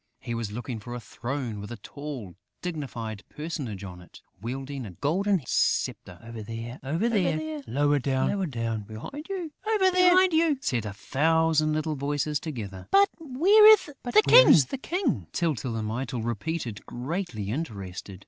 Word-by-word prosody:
He 120 - -5
was 115 -3 -3
looking 120 +1 -5
for 120 +3 -7
a - - -4
throne 120 -1 -5
with 105 - -8
a 120 - -6
tall, 140 -8 -7 0.3
dignified 125 - -5
personage 140 - -5
on 90 -2 -8
it, 90 - -16 0.2
wielding 135 +3 -5
a 105 - -7
golden 190 +3 +1
sceptre. 90 -4 0
"Over 115 -1 -8
there... 115 +3 -7
over 160 - 0
there... 155 -8 0
lower 145 +4 +2
down... 130 - -1
behind 275 - -8 1.1
you!" 320 -3 +3
said 120 - -1
a 100 - -5
thousand 155 +6 +2
little 155 0 -1
voices 145 +1 -1
together. 110 - -7
"But 400 0 +5
where 340 +9 +5
is 435 -2 +8 0.2
the 190 - +6
King?" 335 - -1
Tyltyl 140 -8 -1
and 110 -1 -2
Mytyl 120 +1 -3
repeated, 120 0 -3
greatly 125 - -4
interested. 100 - -5
135 Hz, 140 wpm, -27 LUFS, 115-165 Hz, 1.1 s, is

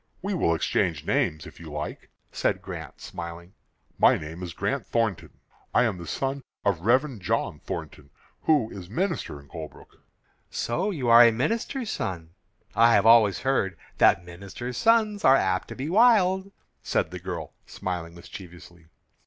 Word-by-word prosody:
"We 200 +1 -1
will 85 - +2
exchange 80 - 0
names, 75 0 0
if - - -12
you 80 -2 -10
like," 75 +1 -6 0.2
said - - 0
Grant, - - -8
smiling. 85 +2 -8 0.5
"My - - +6
name 80 +3 -8
is 90 -2 -5
Grant 125 +7 -1
Thornton. 115 -6 -1 0.4
I - - +6
am 105 -7 -1
the 85 - -8
son 135 +1 -2 0.2
of 100 -5 +1
Rev. 130 - +2
John 90 - -1
Thornton, 70 -2 -7 0.4
who 145 -8 +3
is 90 -3 -9
minister 165 - -2
in 70 - -17
Colebrook." 80 +1 -11 0.5
"So 120 - -1
you 145 -11 -3
are 115 +1 +9
a 115 - +6
minister's 225 - -2
son. 85 -3 -4 0.4
I 115 0 +6
have 100 - +3
always 115 -3 +6
heard 95 -10 0 0.2
that 85 - +5
minister's 100 +8 -7
sons 220 - +3
are 130 - +7
apt 95 -7 +1
to - - -8
be 135 +3 -4
wild," 195 -2 +4 0.3
said - - -1
the - - -6
girl, - - -6
smiling 85 -2 -5
mischievously. 85 -1 -12
110 Hz, 160 wpm, -26 LUFS, 85-140 Hz, 0.5 s, are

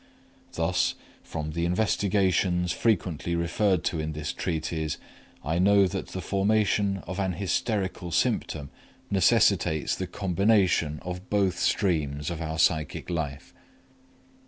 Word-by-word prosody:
Thus, 85 +3 +1 0.3
from 75 +1 -5
the 85 +2 -2
investigations 90 -2 +1
frequently 85 -5 0
referred 85 +2 +1
to 80 - -1
in 80 0 -3
this 75 0 -4
treatise, 80 -2 -2 0.5
I 80 +3 0
know 100 +1 +5
that 95 0 -3
the 95 - -6
formation 100 -1 +1
of 95 +2 -5
an 95 -2 0
hysterical 95 0 -2
symptom 75 -3 -1 0.4
necessitates 85 -4 +3
the 95 - -4
combination 95 -4 +2
of 90 +1 -6
both 100 -3 +1
streams 75 -5 0
of 85 -1 -5
our 80 0 -3
psychic 80 +1 +1
life. 75 -5 -4
90 Hz, 120 wpm, -27 LUFS, 80-95 Hz, 0.5 s, know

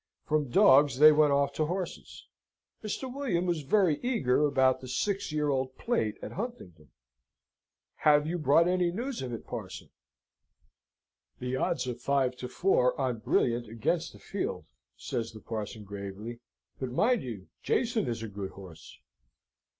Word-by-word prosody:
From 150 -3 0
dogs 135 +2 +5
they 155 +2 +9
went 150 -1 +4
off 140 0 +2
to 155 +1 0
horses. 180 +1 -5 0.6
Mr. 215 +4 -4
William 250 -11 -1
was 170 -3 0
very 170 0 +2
eager 150 - +2
about 130 -2 +2
the 130 - -8
Six 200 +8 -1
Year 150 -1 0
Old 130 -1 -1
Plate 115 - -1
at - - -5
Huntingdon. 90 - -7 1.1
"Have 150 -1 +4
you 175 +3 -2
brought 155 +3 +4
any 180 -1 +2
news 240 +7 -4
of 130 -2 -4
it, 115 - -6
Parson?" - - -7 1.5
"The 125 +1 -3
odds 130 - 0
are 125 - -2
five 130 +1 0
to 125 - -5
four 125 -3 +2
on 125 -4 -1
Brilliant 120 +1 +1
against 110 0 -1
the - - -14
field," - - -4 0.3
says 115 -1 -4
the 110 - -10
parson, 110 0 -6
gravely, 100 +3 -7 0.4
"but, 130 - -3
mind 225 - +2
you, 110 -7 -7
Jason 235 -3 0
is 115 -2 -3
a - - -4
good 100 -2 -6
horse." 90 -5 -12
135 Hz, 155 wpm, -29 LUFS, 115-170 Hz, 1.5 s, they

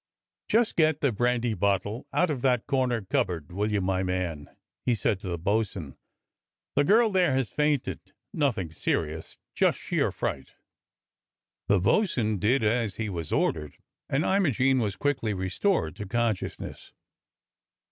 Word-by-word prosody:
*' - - -65
Just 230 0 +2
get 155 -2 +3
the 140 - +3
brandy 120 +1 +1
bottle 100 +3 -1
out 180 -3 +2
of 135 -5 -3
that 125 -3 +2
corner 125 -4 0
cup 95 - +1
board, 85 -4 -6
will 105 +4 -1
you, 105 -1 +1
my 95 0 0
man.^ 90 -5 -2 0.2
" - - -64
he 120 - +4
said 100 -2 0
to 95 - -8
the 85 -1 -2
bo'sun. 95 -5 -1 0.8
"The 145 - +4
girl 220 +7 +4
there 180 -8 +3
has 130 -3 0
fainted. 150 -3 0 0.3
Nothing 115 - 0
serious, 80 0 -2 0.2
just - - +2
sheer - - 0
fright." - - -4 1.1
The 100 -1 +4
bo'sun 110 - +1
did 115 +6 +2
as 110 -2 +1
he 115 -2 -3
was 85 -5 -5
ordered, 75 -3 0 0.3
and 140 +4 +1
Imogene 135 - +2
was 105 -5 -1
quickly 115 -3 -1
restored 95 - 0
to 105 -2 -6
consciousness. 115 -2 -3
110 Hz, 155 wpm, -27 LUFS, 95-135 Hz, 1.1 s, he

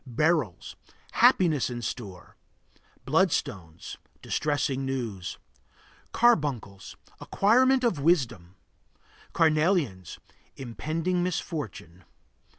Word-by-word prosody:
Beryls 140 - 0 0.4
Happiness 160 -9 +3
in 120 -1 -6
store. 100 -6 -7 0.7
Bloodstones 85 -3 -1 0.3
Distressing 140 -3 -1
news. 120 -9 -4 0.7
Carbuncles 140 - 0 0.2
Acquirement 255 +5 +3
of 225 -11 +1
wisdom. 130 - 0 0.8
Carnelians 155 - +1 0.4
Impending 160 +8 -3
misfortune. 135 - -5
140 Hz, 65 wpm, -27 LUFS, 100-170 Hz, 0.8 s, Happiness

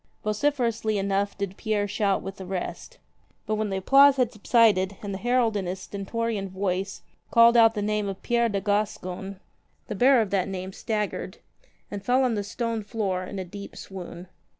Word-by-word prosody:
Vociferously 225 -1 0
enough 200 +1 -1
did 200 -1 -4
Pierre 210 -2 0
shout 200 -1 0
with 195 +1 -7
the 190 - -8
rest. 190 - -5 0.5
But 215 - -1
when 215 0 -1
the 190 - -2
applause 275 +8 +6
had 250 -4 +1
subsided 205 -3 +3
and 200 -1 -4
the 190 - -4
herald 240 -1 +2
in 195 -3 -2
his 185 +2 -3
stentorian 200 +1 -3
voice 190 0 -3 0.3
called 235 0 +6
out 225 -1 +6
the 205 - -1
name 210 -1 0
of 195 0 -7
Pierre 235 -1 +2
de 200 -2 -1
Gas 205 +1 0
con, 185 +2 -7 0.5
the - - -5
bearer 250 +4 +5
of 205 -4 -2
that 195 -2 +1
name 190 0 -5
staggered 210 -1 -3 0.5
and 200 -1 -5
fell 255 +4 +3
on 250 -2 +2
the 205 -2 -1
stone 230 +2 -3
floor 205 -4 -2
in 200 - -7
a 190 - -4
deep 200 +3 -9
swoon. 180 -2 -8
205 Hz, 190 wpm, -26 LUFS, 195-230 Hz, 0.5 s, applause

